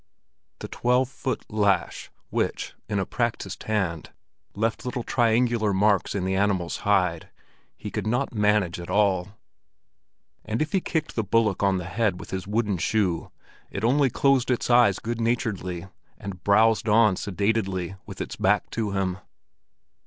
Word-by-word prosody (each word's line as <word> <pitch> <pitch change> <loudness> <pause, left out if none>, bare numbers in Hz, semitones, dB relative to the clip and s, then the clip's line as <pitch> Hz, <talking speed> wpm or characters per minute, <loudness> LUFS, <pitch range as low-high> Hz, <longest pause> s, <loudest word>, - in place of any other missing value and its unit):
The - - -5
twelve 125 +1 +1
foot 135 -1 -4
lash, 100 -4 0 0.2
which, - - -2 0.2
in 105 - -1
a 95 - 0
practised 120 -2 -3
hand, 95 -8 -1 0.5
left 110 +2 -1
little 125 -1 -3
triangular 115 -3 +2
marks 100 0 +2
in 95 -2 -1
the 95 - 0
animal's 95 -3 0
hide, 90 -5 +1 0.5
he - - -7
could - - -3
not 125 +4 0
manage 105 -5 +1
at 85 - -8
all; 100 -1 +1 1.1
and 110 +1 -3
if 155 0 -1
he 190 - +1
kicked 160 -2 -2
the 110 - 0
bullock 105 -1 +1
on 100 -2 +3
the 90 - -4
head 95 0 0
with - - -10
his 95 0 -4
wooden 105 -2 0
shoe, 90 -2 0 0.4
it 100 - -5
only 135 +3 +3
closed 135 0 +2
its 125 0 0
eyes 120 -6 +5
good 115 0 -4
naturedly, 100 -7 -1 0.3
and 95 -3 -8
browsed 110 +2 +3
on 105 -2 +5
sedately 95 -2 -1
with - - -7
its - - -5
back 105 +2 +1
to 110 -3 -2
him. 95 -1 -1
105 Hz, 155 wpm, -25 LUFS, 95-115 Hz, 1.1 s, eyes